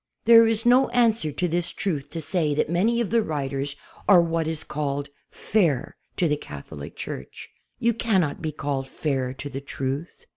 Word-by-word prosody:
It 235 - +3
is 225 -1 +6
no 250 +2 +5
answer 230 -9 +2
to 180 +5 -1
this 175 0 0
truth 145 -7 -3
to 165 - -5
say 155 -2 +1
that 155 - 0
many 225 +7 +2
of 220 - -2
the 230 0 +4
writers 140 -4 -3 0.3
are 190 -3 +9
what 165 -1 +1
is 160 -1 -2
called 145 -1 -3 0.2
"fair" 170 - 0 0.2
to 175 - +2
the 150 -1 +1
Catholic 75 - -9
Church. - - -7 0.3
You 235 0 +2
cannot 190 -10 0
be 155 -1 -2
called 140 -2 -3
"fair" 135 -3 -2
to 140 - -6
the 140 -1 -6
truth. 140 - -5
160 Hz, 180 wpm, -25 LUFS, 140-210 Hz, 0.3 s, are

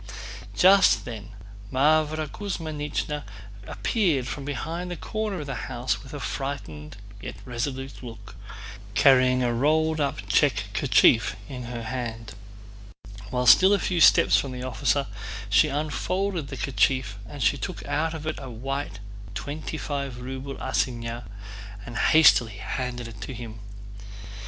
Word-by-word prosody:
Just 195 +2 +6
then 110 -3 -7 0.4
Mávra 155 +3 +2
Kuzmínichna 150 -5 -3 0.5
appeared 170 - 0
from 140 +2 -5
behind 165 +6 -4
the 175 - -3
corner 215 -5 -3
of - - -6
the 140 - -4 0.2
house 125 0 -1
with 135 - -12
a 145 - -6
frightened 100 - -5 0.2
yet 100 - -6
resolute 130 +2 -4
look, 115 -3 -10 0.6
carrying 130 +2 +5
a 120 -1 +1
rolled 155 +5 +2
up 130 -8 -2
check 105 -2 +2
kerchief 115 +1 +4
in 125 -3 -6
her 120 -1 -5
hand. 115 -2 -5 1.0
While 125 +1 -1
still 190 +10 +8
a - - +5
few 175 -1 0
steps - - +7
from 135 -2 -4
the 125 0 -6
officer 130 +3 0 0.5
she 105 +1 +6
unfolded 165 +4 -2
the 135 - -7
kerchief 130 -6 +1
and 145 - -9
took 140 +6 -1
out 155 +3 -1
of 155 -1 -7
it 155 - -3
a 135 -2 -7
white 135 -1 -4 0.4
twenty 145 +8 -5
five 140 -5 -4
ruble 130 +2 -6
assignat 120 -1 -2 0.6
and 120 - -8
hastily 125 -4 +5
handed 125 +3 -4
it 110 -2 -11
to 130 - -6
him. 115 -2 -8
135 Hz, 135 wpm, -26 LUFS, 120-150 Hz, 1.0 s, still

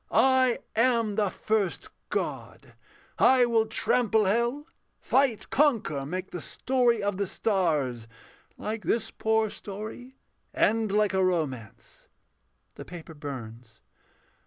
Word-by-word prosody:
I 260 -2 +4 0.2
am 230 -2 +2
the 205 -1 +1
first 210 -2 -1 0.2
God; - - -4 0.5
I 255 -1 +6
will 225 -2 +2
trample 220 -1 +2
hell, 235 +8 0 0.3
Fight, 260 -5 +1
conquer, 220 - +1
make 185 +4 -5
the 175 - -5
story 240 - +1
of 200 -2 -1
the 200 -1 -1
stars, 150 - 0 0.5
Like 215 +1 -4
this 225 0 -1
poor 220 -1 0
story, 215 +6 -8 0.4
end 220 -1 +2
like 210 -1 +2
a 190 0 +2
romance: 130 -11 -3 0.7
[_The - - -9
paper 165 -2 -9
burns. 120 -6 -9
210 Hz, 115 wpm, -27 LUFS, 165-235 Hz, 0.7 s, I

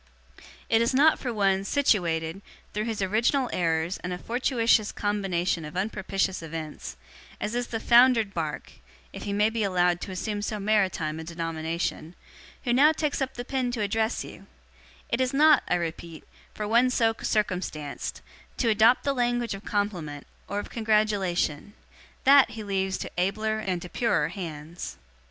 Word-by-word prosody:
'It 225 0 +3
is 235 +3 +1
not 305 +4 +5
for 250 - -3
one, 195 -3 +1
situated, 180 - +1 0.3
through 210 +1 -2
his 220 -4 -2
original 235 +6 +1
errors 165 0 0
and 180 - -5
a 180 - -3
fortuitous 230 -1 +1
combination 190 -5 -1
of 150 +3 -7
unpropitious 195 -2 -1
events, 155 - -7 0.4
as 210 - -3
is 245 0 -1
the 225 - -3
foundered 235 -3 +5
Bark - - -4 0.4
(if - - -7
he 205 - -3
may 210 +2 +2
be 225 0 -2
allowed 180 -3 +2
to - - -5
assume 205 +3 -3
so 210 +1 -3
maritime 190 -7 0
a - - -6
denomination), 165 0 -4 0.5
who 240 - +1
now 285 +5 +6
takes 300 -2 -2
up 265 0 -2
the 245 - -5
pen 260 -1 -1
to 230 - -2
address 220 +3 0
you - - -12 0.6
it 235 - 0
is 255 +1 0
not, 305 0 +6
I - - +2
repeat, 165 -1 -5 0.3
for 210 - -3
one 235 +4 +4
so 230 -3 +2
circumstanced, 180 -8 -2 0.3
to 235 - +1
adopt 225 +3 +5
the 280 - +1
language 240 -3 0
of 195 +1 -8
compliment, 175 -9 -3 0.2
or 200 - -4
of 205 - -5
congratulation. 205 -6 0 0.5
That 275 0 +7
he 220 - -7
leaves 190 -1 -1
to - - -6
abler 215 +4 0
and 185 -4 -2
to - - -7
purer 180 -7 +1
hands. 165 -2 -7
205 Hz, 165 wpm, -26 LUFS, 175-235 Hz, 0.6 s, That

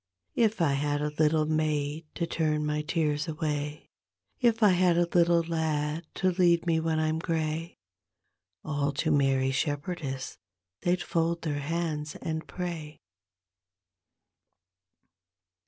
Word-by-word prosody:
If 220 -5 +2
I 145 -4 +3
bad 145 0 0
a 150 - -1
little 155 0 +3
maid 155 0 -1
to 170 - -1
turn 155 -2 0
my 150 0 0
tears 150 -1 0
away. 150 -1 -3 0.5
If 235 -3 +3
1 210 -4 +6
had 180 -1 +3
a 175 - +4
little 170 -1 +4
lad 160 -1 -1
to 185 -1 +2
lead 175 -1 +3
me 165 -2 +2
when 160 -1 0
I'm 155 0 0
gray. 165 0 -2 0.9
All 145 -2 -1
to 155 +3 0
Mary 135 -2 +3
Shepherdess 145 - -3 0.4
they'd 175 0 +1
fold 165 +1 0
their 145 -3 -1
hands 150 0 -2
and 160 0 -4
pray. 165 -4 -5
155 Hz, 125 wpm, -28 LUFS, 150-170 Hz, 0.9 s, 1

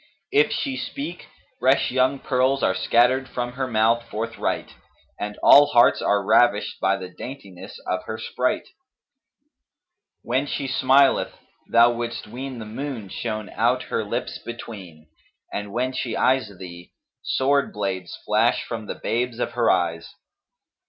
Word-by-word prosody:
If 430 +2 +4
she 270 -3 -2
speak, 265 -13 -6 0.3
fresh 130 +3 +3
young 130 +2 +2
pearls 130 0 +1
are - - +3
scattered 125 +7 +2
from 120 0 -3
her 130 +1 -3
mouth 115 0 +2
forthright 115 +2 -3 0.5
and 105 0 -4
all 145 +1 +8
hearts 120 - +4
are 100 -1 +1
ravished 110 0 +3
by 95 +1 +2
the 95 -1 -7
daintiness 100 -1 -10
of 90 0 -1
her 110 - -5
sprite; 125 +3 -2 1.6
when 130 +4 0
she 140 -1 -3
smileth 135 +1 +3 0.3
thou 120 +1 +6
wouldst 120 0 -4
ween 130 +4 -7
the 115 - -7
moon 115 -2 -6
shone 110 -1 -4
out 120 +4 +1
her - - +1
lips 115 +4 -4
between 95 -9 -9 0.5
and 105 0 -4
when 125 +4 -1
she 120 -3 -3
eyes 130 -5 +2
thee, 90 -1 -11 0.3
sword 140 +1 +1
blades 95 -4 -4
flash - - +2
from 110 -2 -6
the - - -4
babes 120 0 -2
of - - -2
her 120 -1 +1
eyes. 85 -2 0
120 Hz, 145 wpm, -23 LUFS, 105-130 Hz, 1.6 s, all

